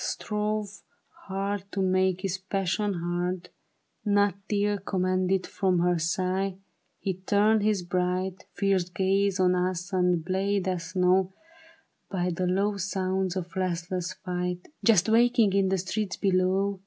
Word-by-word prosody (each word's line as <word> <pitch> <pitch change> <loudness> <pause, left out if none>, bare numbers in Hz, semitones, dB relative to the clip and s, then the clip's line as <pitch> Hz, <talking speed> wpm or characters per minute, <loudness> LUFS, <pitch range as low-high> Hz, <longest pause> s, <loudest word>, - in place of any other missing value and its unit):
Strove 210 -1 -2 0.5
hard 195 0 -2
to - - -2
make 185 -1 +2
his 190 -1 -2
passion 195 +1 -1
heard; 175 +1 -2 0.5
Not 205 -2 +3 0.2
till 205 0 +1
commanded 185 0 0
from 185 -2 0
her 175 0 +2
sight. 185 +3 -1 0.4
He 195 - -2
turned 205 +4 +2
his 205 -3 +1
bright 180 +1 -2
Fierce 195 -3 +1
gaze 195 +1 +1
on 180 -1 +4
us 180 0 -1
and 180 -3 +2
bade 195 +1 0
us 180 -1 -3
know 185 +1 +3 0.8
By 180 -2 -1
the 180 +1 -1
low 200 +3 +1
sounds 190 -1 -1
of 175 -2 -5
restless 180 0 -2
fight 180 0 -4
Just 220 -6 +5
waking 230 -2 +4
in 195 -1 +3
the 190 - +1
streets 190 +1 -2
below. 190 +1 +1
190 Hz, 135 wpm, -27 LUFS, 180-200 Hz, 0.8 s, Just